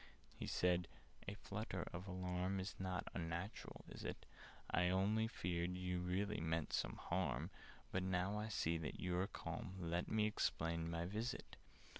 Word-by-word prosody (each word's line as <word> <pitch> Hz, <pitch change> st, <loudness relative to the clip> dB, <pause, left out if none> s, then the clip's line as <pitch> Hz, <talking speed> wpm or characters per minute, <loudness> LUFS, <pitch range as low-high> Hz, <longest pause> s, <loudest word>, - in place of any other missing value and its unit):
He -, -, -4 dB
said 90 Hz, -1 st, +3 dB, 0.4 s
"A 100 Hz, -, -1 dB
flutter 100 Hz, -3 st, -3 dB
of 90 Hz, +3 st, -4 dB
alarm 90 Hz, +1 st, 0 dB
Is 95 Hz, +2 st, -2 dB
not 95 Hz, -1 st, -1 dB
unnatural, 85 Hz, +3 st, -3 dB
is -, -, -7 dB
it? -, -, -3 dB, 0.5 s
I 90 Hz, +1 st, +5 dB
really 100 Hz, +5 st, +4 dB
feared 90 Hz, -4 st, 0 dB
you 90 Hz, -1 st, 0 dB
meant 90 Hz, -3 st, +1 dB
some -, -, +1 dB
harm: 85 Hz, -2 st, 0 dB, 0.4 s
But, 95 Hz, -, +2 dB
now 95 Hz, +2 st, +2 dB
I 105 Hz, -, -1 dB
see 85 Hz, -6 st, +2 dB
that 80 Hz, -, -3 dB
you 90 Hz, -1 st, +1 dB
are 95 Hz, -, +3 dB
calm, 100 Hz, -2 st, -4 dB
Let 85 Hz, 0 st, +1 dB
me 110 Hz, -1 st, +4 dB
explain 85 Hz, -5 st, +1 dB
my 85 Hz, 0 st, 0 dB
visit. 110 Hz, +7 st, -2 dB
90 Hz, 155 wpm, -43 LUFS, 85-100 Hz, 0.5 s, I